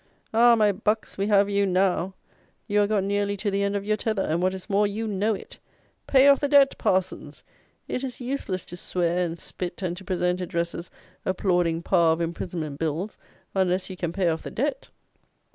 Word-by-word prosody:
Ah! 235 +1 +6
my 210 -2 +4
bucks, 210 +3 -1
we 195 +1 -1
have 200 -1 +4
you 200 0 +1
now! 185 0 +1 0.5
You 210 -1 +2
are 205 - +2
got 205 -2 +1
nearly 200 +1 0
to 205 +1 -2
the 200 0 0
end 200 0 0
of 200 0 -2
your 215 0 +1
tether; 215 -3 -1
and, 160 +3 0
what 185 +1 +1
is 190 - -9
more, 205 0 +2
you 215 +3 -3
know 210 +1 0
it. - - -11 0.5
Pay 270 0 +6
off 280 -1 +6
the 285 - 0
Debt, 280 -1 +5
parsons! 185 0 -1 0.4
It 255 - -3
is 260 -2 -5
useless 245 -8 -3
to 175 - -9
swear 175 0 0
and 170 -1 -3
spit, 180 +2 -6
and 175 -1 -1
to 195 - -9
present 180 -1 -1
addresses 170 0 -3 0.3
applauding 175 -3 0
Power 170 -3 +4
of 165 - -4
Imprisonment 165 -3 -4
Bills, 165 +6 -3 0.3
unless 190 0 0
you - - -6
can 175 -2 -3
pay 185 0 0
off 160 -1 0
the - - -7
Debt! 270 +2 -2
195 Hz, 200 wpm, -25 LUFS, 175-210 Hz, 0.5 s, Ah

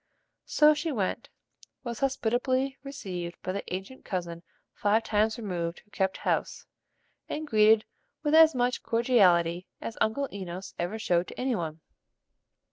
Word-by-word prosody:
So 305 0 +6
she 310 +2 -2
went, 205 -8 -2 0.5
was 235 -3 -5
hospitably 260 +1 0
received 185 -11 -6
by 185 - -2
the 200 +1 -3
ancient 195 +8 -6
cousin 170 -3 -4 0.3
five 215 +2 +2
times 215 +1 +1
removed 175 -6 -3
who 210 - -33
kept 190 -2 0
house, - - -1 0.6
and 310 +1 -3
greeted 215 -3 +5 0.4
with 295 0 +1
as 320 -2 +7
much 245 0 +1
cordiality 185 -8 +3
as 225 - -6
Uncle 275 +6 +1
Enos 185 -1 -6
ever 175 +5 -2
showed 180 -5 +1
to - - -10
any 255 0 0
one. 160 -4 -4
215 Hz, 140 wpm, -28 LUFS, 180-260 Hz, 0.6 s, as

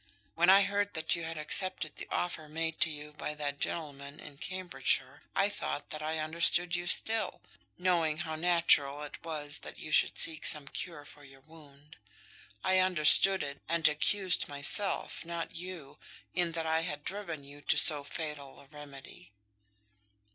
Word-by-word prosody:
When 175 +2 +2
I 195 +1 +7
heard 205 0 -2
that 160 - +1
you 170 - -5
had 165 0 -6
accepted 155 0 +1
the - - -7
offer 160 -3 -3
made 160 +1 -4
to 160 - +5
you 150 0 -8
by 150 0 -6
that 145 -1 -4
gentleman 140 -2 -6
in 145 -1 -12
Cambridgeshire, 185 -1 -2
I - - +3
thought 70 0 -5
that 155 - -5
I 155 +1 -3
understood 170 +3 +3
you 175 0 -4
still, 220 +4 +1 0.4
knowing 170 -4 +1
how 160 -1 -5
natural 155 -4 +2
it 145 - -10
was 150 -3 -3
that - - -10
you 155 - -9
should - - +2
seek 160 -1 +1
some 150 -3 +4
cure 150 -1 -4
for 145 - -15
your 135 -1 -16
wound. 150 -1 -18 0.7
I 185 0 +3
understood 185 +1 +5
it, 140 -1 -7
and 165 -1 +2
accused 185 +5 +1
myself, 145 +8 0
not 170 0 -6
you, 175 -5 -9 0.3
in 175 -2 +1
that 165 -1 -3
I 160 0 +1
had 150 -3 -4
driven 170 -7 -6
you 145 +1 -11
to - - +1
so 150 -3 +8
fatal 145 -2 -7
a - - -16
remedy." 140 - -13
155 Hz, 170 wpm, -30 LUFS, 145-175 Hz, 0.7 s, so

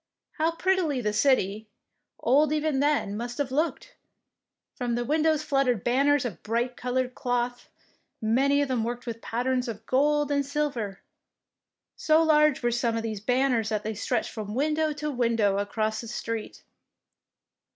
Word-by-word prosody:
How 325 +1 +2
prettily 355 -6 +1
the 210 -3 -1
city, 215 -3 +2 0.5
old 290 +4 +3
even 305 -2 0
then, 285 -8 +1
must 240 +2 -5
have 285 -3 -2
looked 325 - -1
I - - -37 0.8
From 245 -3 -2
the 240 0 -2
windows 310 +2 +2
fluttered 270 -8 +1
banners 275 +2 +2
of 225 -7 -5
bright 235 +3 -1
coloured 250 +1 -2
cloth, 245 0 -2 0.5
many 270 +6 +2
of - - -2
them 250 -4 0
worked 240 +2 -4
with 230 -2 -6
patterns 250 +2 -1
of 220 -2 -6
gold 295 +2 +2
and 285 0 +2
silver! 275 -8 -3 0.9
So 315 +1 +3
large 300 -4 +4
were 240 - +2
some 235 -1 0
of 225 - -3
these 220 -2 -3
banners 245 -1 +1
that 215 -1 -1
they 220 - -3
stretched 230 +3 -2
from 215 -2 -6
window 305 +3 +1
to 300 +1 -3
window 230 -6 +1
across 215 +2 -1
the 230 - -9
street. 230 -1 -5
250 Hz, 160 wpm, -27 LUFS, 230-290 Hz, 0.9 s, large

